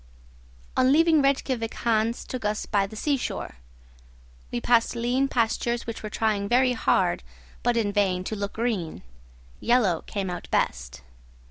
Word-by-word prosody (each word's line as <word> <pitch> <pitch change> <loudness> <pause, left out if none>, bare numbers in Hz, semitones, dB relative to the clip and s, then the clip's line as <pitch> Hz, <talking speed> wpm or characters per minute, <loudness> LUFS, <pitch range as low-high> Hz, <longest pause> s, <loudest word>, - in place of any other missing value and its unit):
On 255 +1 +4
leaving 320 +1 +5
Rejkiavik 265 -4 0
Hans 230 0 0
took 255 -3 -5
us 210 +1 -1
by 200 -2 +1
the 215 - -11
seashore. 275 - -2 0.9
We - - -1
passed 235 - +2
lean 245 +3 +1
pastures 235 -1 0
which 230 -1 -6
were 215 - -5
trying 210 -2 0
very 250 +1 +4
hard, 185 - +1 0.4
but 240 -1 +1
in 205 -3 0
vain, 190 -3 +1
to 215 - -4
look 200 -1 -4
green; 210 - -2 0.6
yellow 230 -9 +2
came 195 -3 -4
out 175 - -6
best. 65 +1 -1
225 Hz, 145 wpm, -26 LUFS, 200-245 Hz, 0.9 s, leaving